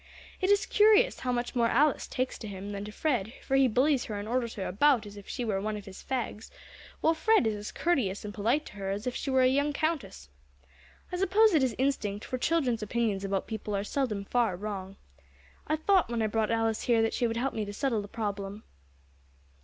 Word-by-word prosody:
It 375 - +1
is 405 0 +4
curious 435 +3 +4
how 250 - -1
much 240 0 -2
more 235 -1 +3
Alice 280 +5 +2
takes 255 0 -3
to 220 - -7
him 200 0 -6
than 200 0 -4
to 210 - -7
Fred, 240 -4 -1
for 270 - 0
he 270 -1 +5
bullies 260 +3 +2
her 210 - -4
and 205 +1 -5
orders 235 0 -1
her 195 - -4
about 240 +4 +3
as 205 0 -10
if 205 -1 -11
she 245 - -3
were 195 -3 -1
one 215 +1 -2
of 205 - -9
his 190 -1 -11
fags, 235 -4 -4 0.5
while 320 - +4
Fred 435 - +3
is 220 - +1
as 210 0 -6
courteous 235 - 0
and 205 - -6
polite 235 +9 +1
to - - -11
her 195 -1 -4
as 200 +2 -3
if 250 - -2
she - - -3
were 260 -1 +4
a - - +6
young 285 +3 +1
Countess. 285 - -2 0.8
I 360 - -2
suppose 400 +3 +4
it 310 - +4
is 255 -4 +1
instinct, 220 -6 -1
for 255 - -4
children's 255 -7 +1
opinions 210 -2 -1
about 195 -1 -1
people 215 -2 -4
are 200 - -1
seldom 210 -4 -2
far 235 -4 +1
wrong. 195 -1 -5 0.7
I 310 - +2
thought 365 - +2
when 235 -2 -1
I - - +2
brought 215 0 0
Alice 225 -1 0
here 230 -2 +3
that 225 - 0
she 240 - +1
would 225 0 -3
help 265 +3 -1
me 220 - -2
to 205 - -5
settle 230 0 -1
the 205 - -8
problem." 205 -1 -4
230 Hz, 230 wpm, -29 LUFS, 205-270 Hz, 0.8 s, a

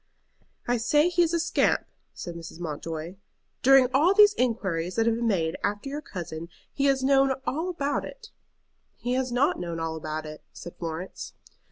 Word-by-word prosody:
"I 245 0 +2
say 295 +8 +3
he 350 0 +2
is 335 -2 +3
a 340 - +1
scamp," 330 0 +1 0.3
said 175 - -7
Mrs. 170 0 -9
Mountjoy. 165 +2 -5 0.4
"During 270 0 +7
all 325 +9 +4
these 415 0 +7
inquiries 190 - -1
that 225 - +2
have 230 - +3
been 235 +1 -1
made 165 -6 0
after 205 +6 -2
your 290 +2 -4
cousin 170 - -7 0.2
he 280 - 0
has 270 -1 +2
known 270 0 +4
all 320 +7 -1
about 290 -5 -1
it." 480 -3 -10 0.6
"He 245 - -3
has 255 -1 0
not 250 +4 +2
known 170 -2 -4
all 165 0 -2
about 155 0 -4
it," 155 0 -9
said 175 - -9
Florence. 165 +2 -6
235 Hz, 180 wpm, -26 LUFS, 170-280 Hz, 0.6 s, During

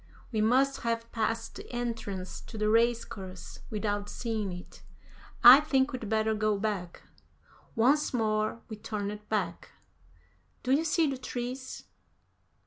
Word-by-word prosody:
"We 220 -3 0
must 260 +5 +3
have 230 0 -2
passed 225 0 -1
the - - -10
entrance 225 -6 -4
to 225 - -8
the 215 0 +1
race 230 +1 +3
course 190 -2 -9
without 205 -1 -2
seeing 220 -5 -3
it. 180 0 -10 0.6
I 250 +3 +12
think 275 -2 +1
we'd 235 -5 -5
better 220 0 +2
go 215 -1 +1
back." 195 -4 -3 0.7
Once 270 +6 +3
more 215 -1 0
we 215 - -7
turned 210 -1 -5
back. 215 -1 -2 0.9
"Do 255 - -1
you 300 +4 +3
see 325 +1 +3
the 275 -3 -2
trees?" 255 +1 -5
225 Hz, 135 wpm, -29 LUFS, 210-245 Hz, 0.9 s, I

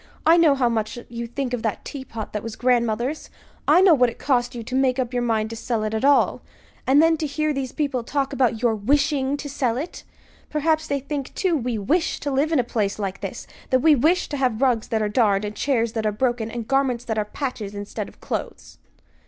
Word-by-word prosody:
"I 325 - +7
know 330 -4 +5
how 260 -3 +2
much 225 +1 -1
you 235 0 -5
think 250 +1 -3
of 245 - -1
that 220 -2 -3
teapot 240 -6 -7
that 210 - -2
was 225 0 -6
grandmother's. 245 +3 0 0.4
I 360 - +6
know 380 -3 +7
what 250 -4 +4
it 235 - -10
cost 245 -3 0
you 235 - -5
to 245 - -8
make 260 -1 +2
up 255 -1 -2
your 245 - 0
mind 225 -2 0
to - - -5
sell 225 -1 -2
it 215 0 -2
at 220 - -2
all. 285 0 +3 0.5
And 280 +4 +6
then 325 0 +4
to 310 - -2
hear 305 +1 -1
these 270 -2 -3
people 280 -5 -1
talk 275 +2 -2
about 250 -4 +1
your 235 -2 +3
wishing 275 +5 +1
to 290 - -6
sell 255 -4 -1
it! 310 +7 -6 0.5
Perhaps 315 +1 +1
they 280 -1 -1
think, 280 0 -5
too, 370 -3 +1
we 245 -5 -1
wish 315 - 0
to 285 - -2
live 280 +4 +1
in 320 - +3
a 250 - +3
place 210 -4 -1
like 195 -2 -4
this; - - -6 0.2
that 255 -1 +3
we 315 +2 +6
wish 320 +7 +2
to 290 - -3
have 250 -5 0
rugs 240 -4 +2
that 220 -1 0
are - - +1
darned, 210 -2 +2
and 210 0 -5
chairs 235 -4 0
that 220 -2 -1
are - - +1
broken, 240 0 -1
and 230 -1 -5
garments 270 -3 +1
that 220 -2 -1
are 210 - 0
patches 210 -4 -5
instead 205 0 -5
of - - -21
clothes!" - - -6
250 Hz, 235 wpm, -23 LUFS, 225-285 Hz, 0.5 s, I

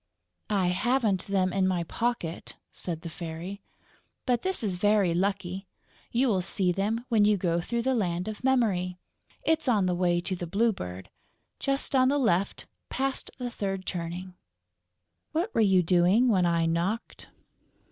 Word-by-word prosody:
"I 195 -4 +2
haven't 220 -1 +1
them 190 -2 +1
in 190 -1 +2
my 180 -2 0
pocket," 200 -2 -3 0.2
said 165 -3 -5
the 170 - -6
Fairy. 170 +4 -6 0.6
"But 245 -2 +2
this 375 -8 -1
is 190 -4 -1
very 205 -2 +3
lucky; 190 +1 -1 0.4
you 250 +3 +2
will 195 -6 +2
see 185 0 0
them 215 +6 -1
when 220 -4 +4
you 210 0 +4
go 175 -2 0
through 235 +6 -2
the 265 +1 +2
Land 180 -6 -1
of 215 +2 -6
Memory. 205 -9 +1 0.5
It's 320 -3 +1
on 215 -6 +3
the 180 - +1
way 175 -1 +2
to 180 +2 -2
the 175 -1 -5
Blue 220 +6 +2
Bird, 90 - -7 0.5
just 275 0 -1
on 255 -1 +5
the 285 +2 +2
left, 200 -8 +1 0.2
past 270 0 -2
the 245 -2 -4
third 195 -3 -3
turning.... 180 +1 -4 1.0
What 350 +8 -1
were - - +3
you 190 -4 +4
doing 180 +8 +4
when 185 -5 +3
I 170 -1 +2
knocked?" 170 +7 -2
195 Hz, 165 wpm, -28 LUFS, 175-230 Hz, 1.0 s, on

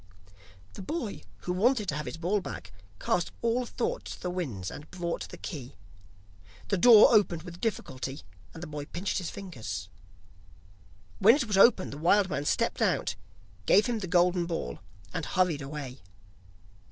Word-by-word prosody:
The - - -8
boy, 235 - -4 0.2
who 180 - -2
wanted 215 +3 +2
to 140 - -1
have 150 0 -4
his - - -5
ball 185 +5 0
back, - - -7 0.3
cast - - 0
all 240 +1 +1
thought - - -2
to - - -7
the 180 - -3
winds, 125 - -4
and 150 - -10
brought 170 -2 -4
the - - -9
key. 140 -6 -7 0.9
The 200 - +2
door 230 +2 +8
opened 190 -6 +3
with 175 -1 -10
difficulty, 135 - -3 0.3
and 165 - -9
the - - -5
boy 150 -1 -6
pinched 180 +7 -2
his 180 - -4
fingers. 110 - -6 1.3
When 215 +5 +7
it 285 -4 0
was 210 -3 -1
open 195 -1 +5
the 145 - -7
wild 190 +3 +3
man 145 - -2
stepped - - 0
out, - - +1 0.5
gave 205 - +6
him 240 -3 -1
the 190 - -4
golden 175 -1 +3
ball, 165 -1 -4 0.3
and - - -2
hurried 180 -6 +1
away. 135 -2 -7
180 Hz, 165 wpm, -29 LUFS, 150-205 Hz, 1.3 s, door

